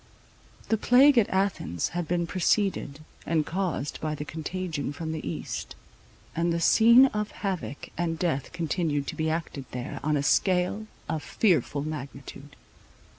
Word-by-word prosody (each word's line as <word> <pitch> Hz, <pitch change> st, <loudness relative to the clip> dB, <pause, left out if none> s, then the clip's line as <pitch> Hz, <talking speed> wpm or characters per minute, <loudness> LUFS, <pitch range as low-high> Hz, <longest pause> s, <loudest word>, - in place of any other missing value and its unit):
The 220 Hz, -, +3 dB
plague 260 Hz, +3 st, +6 dB
at 210 Hz, -, +2 dB
Athens 190 Hz, -, 0 dB
had 175 Hz, -1 st, -3 dB
been 175 Hz, +1 st, 0 dB
preceded 185 Hz, -4 st, 0 dB, 0.2 s
and 160 Hz, -2 st, +1 dB
caused 175 Hz, -6 st, -2 dB
by 155 Hz, -1 st, -2 dB
the 150 Hz, -, -5 dB
contagion 160 Hz, -2 st, -4 dB
from 160 Hz, +2 st, -5 dB
the 160 Hz, -1 st, -4 dB
East; -, -, -5 dB, 0.6 s
and 170 Hz, +1 st, +1 dB
the 170 Hz, -, 0 dB
scene 235 Hz, +9 st, +7 dB
of 210 Hz, -5 st, -1 dB
havoc 165 Hz, -, -4 dB
and 165 Hz, -1 st, 0 dB
death 160 Hz, -6 st, -1 dB
continued 160 Hz, -3 st, -1 dB
to -, -, -5 dB
be 160 Hz, 0 st, -1 dB
acted 160 Hz, -4 st, -3 dB
there, 125 Hz, 0 st, -5 dB
on 150 Hz, 0 st, +1 dB
a 140 Hz, -, -1 dB
scale 185 Hz, +6 st, +2 dB, 0.2 s
of 155 Hz, 0 st, -2 dB
fearful 150 Hz, -, +1 dB
magnitude. 140 Hz, -1 st, -7 dB
165 Hz, 150 wpm, -27 LUFS, 145-185 Hz, 0.6 s, scene